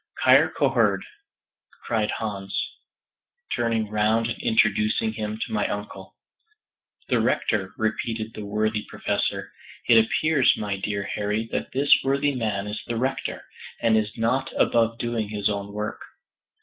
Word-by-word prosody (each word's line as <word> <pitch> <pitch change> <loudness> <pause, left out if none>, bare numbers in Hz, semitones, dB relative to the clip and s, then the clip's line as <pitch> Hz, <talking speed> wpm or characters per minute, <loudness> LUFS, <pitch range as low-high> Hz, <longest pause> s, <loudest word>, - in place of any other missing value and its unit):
"Kyrkoherde," - - +4 0.8
cried 110 -2 0
Hans, 100 -3 -3 1.0
turning 115 -2 0
round 110 +2 +2
and - - -4
introducing 225 -1 +2
him 105 0 -4
to - - -11
my 105 - +1
uncle. 105 +1 -6 0.9
"The - - +3
Rector," - - 0
repeated 110 0 -2
the 105 - -7
worthy 105 +1 -1
Professor; - - -2 0.4
"it 115 -2 +7
appears, 150 +3 +3
my 100 -2 -2
dear 100 0 -2
Harry, 105 +2 -2
that - - -3
this 140 +2 +5
worthy 140 +1 +1
man 105 -6 -2
is 105 +1 -4
the 115 - -2
Rector, 130 +3 -2 0.4
and 115 -1 +3
is 110 -1 0
not 125 +4 0
above 115 -1 +3
doing 115 -3 -2
his 105 -1 0
own 100 0 -4
work." 105 +1 -4
110 Hz, 135 wpm, -25 LUFS, 105-120 Hz, 1.0 s, it